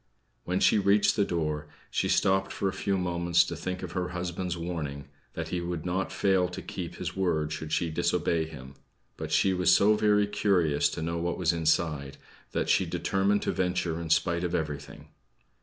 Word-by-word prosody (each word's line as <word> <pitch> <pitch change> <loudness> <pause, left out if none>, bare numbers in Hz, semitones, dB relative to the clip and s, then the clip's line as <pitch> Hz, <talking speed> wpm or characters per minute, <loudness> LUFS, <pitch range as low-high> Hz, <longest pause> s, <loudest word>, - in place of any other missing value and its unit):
When 90 +1 0
she 105 - +4
reached 100 +1 +3
the 105 - +3
door 75 -5 -2 0.2
she - - 0
stopped 95 0 +2
for 100 - -2
a 95 - -1
few 100 -1 -1
moments 85 -1 +2
to - - -5
think 95 0 -4
of 90 - -5
her 90 0 -2
husband's 90 0 -3
warning, 75 -5 -4 0.3
that - - -4
he 90 - -2
would 85 -2 -4
not 90 +2 -1
fail 95 -2 +2
to 90 - -7
keep - - -6
his - - -5
word 80 -5 0
should 80 0 -6
she 85 0 0
disobey 85 0 +1
him. 65 -3 -10 0.4
But - - -6
she 95 - +3
was 90 -1 +3
so 100 +3 +5
very 105 -1 +3
curious 90 -8 +2
to 80 - -5
know 85 +1 -2
what 85 +1 -2
was 90 -2 +2
inside, 80 -4 0 0.3
that - - -1
she - - +3
determined 100 +1 +1
to - - 0
venture 90 -2 -1
in 85 - -5
spite 85 +2 +2
of 90 0 -1
everything. 75 -2 -5
85 Hz, 190 wpm, -28 LUFS, 80-95 Hz, 0.4 s, so